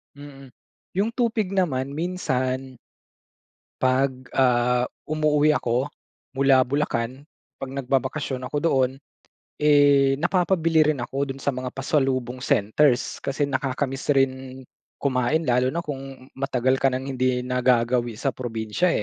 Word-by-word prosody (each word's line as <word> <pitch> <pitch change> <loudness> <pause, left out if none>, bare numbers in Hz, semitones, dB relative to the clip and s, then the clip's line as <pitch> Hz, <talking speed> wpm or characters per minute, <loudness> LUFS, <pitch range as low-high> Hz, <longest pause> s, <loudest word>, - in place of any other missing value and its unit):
mm. 140 -2 -12 0.5
Yung 220 +4 +1
tupig 225 -6 0
naman 140 -8 0
minsan 130 -7 -2 1.0
'Pag, 130 0 0
ah, 125 -1 +2 0.2
umuuwi 150 0 +2
ako 120 +1 0 0.5
mula 135 -1 +4
Bulacan 130 -2 -2 0.4
pag 135 - -4
nagbabakasyon 135 0 -2
ako 145 - -2
doon, 135 -5 +2 0.7
eh, 145 -2 +5
napapabili 170 -3 +2
rin 130 - -6
ako 135 +3 -2
doon 135 - -13
sa 140 - 0
mga 130 -1 -4
pasalubong 135 -3 -1
centers 125 +2 +1
kasi 140 +1 -2
nakaka-miss 135 +1 -1
rin 130 -1 -1 0.4
kumain 135 +3 +1
lalo 125 +1 +2
na 170 - -1
kung 135 -3 -8
matagal 130 -1 +1
ka 135 - +3
nang 130 +1 -3
hindi 130 -1 0
nagagawi 125 -1 +1
sa 135 - 0
probinsiya, 120 +6 -2
135 Hz, 120 wpm, -24 LUFS, 125-145 Hz, 1.0 s, eh